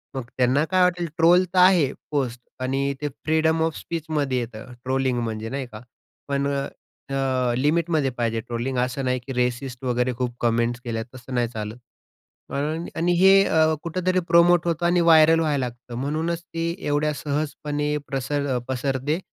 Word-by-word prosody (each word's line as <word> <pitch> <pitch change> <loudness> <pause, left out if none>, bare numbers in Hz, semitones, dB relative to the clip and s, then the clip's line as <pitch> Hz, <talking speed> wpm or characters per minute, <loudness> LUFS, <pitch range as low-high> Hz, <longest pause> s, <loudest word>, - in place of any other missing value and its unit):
मग 130 - -3
त्यांना 130 +4 +3
काय 185 +2 +1
वाटेल. 175 -1 +1
ट्रोल 175 +3 +6
तर - - -2
आहे 180 -7 +5 0.2
पोस्ट 130 -5 -1 0.2
आणि 135 +2 0
ते 150 - -1 0.2
फ्रीडम 160 +1 +2
ऑफ 160 -2 -1
स्पीचमध्ये 150 -5 -2
येतं 115 0 -7
ट्रोलिंग 130 -1 0
म्हणजे 110 -1 -4
नाही 135 +2 -3
का? 110 -2 -11 0.5
पण 140 0 0
अ, 140 0 -1 0.5
अ, 130 -2 +1
लिमिटमध्ये 155 +1 +1
पाहिजे 115 -1 0
ट्रोलिंग, 120 +2 -3
असं 125 +2 -1
नाही 125 0 0
की 130 +2 -7
रेसिस्ट 125 +1 -2
वगैरे 125 0 0
खूप 125 -1 -2
कमेंट्स 120 0 +1
केल्या, 115 -2 -3
तसं 130 +1 -9
नाही 120 -1 +2
चालत 110 -1 -6 0.8
आणि 155 +4 -2
आणि 170 +2 +1
हे 195 +1 +7
अ, 160 0 +3
कुठेतरी 185 +2 0
प्रोमोट 170 0 +5
होतं 170 0 0
आणि 175 +1 +3
व्हायरल 165 -1 +6
व्हायला 145 -5 +1
लागतं. 120 0 -9
म्हणूनच 160 +4 -2
ते 165 -1 -3 0.2
एवढ्या 150 +1 +1
सहजपणे 150 0 -2
प्रसर 135 0 -1
पसरते 135 +4 -1
140 Hz, 160 wpm, -24 LUFS, 125-160 Hz, 0.8 s, हे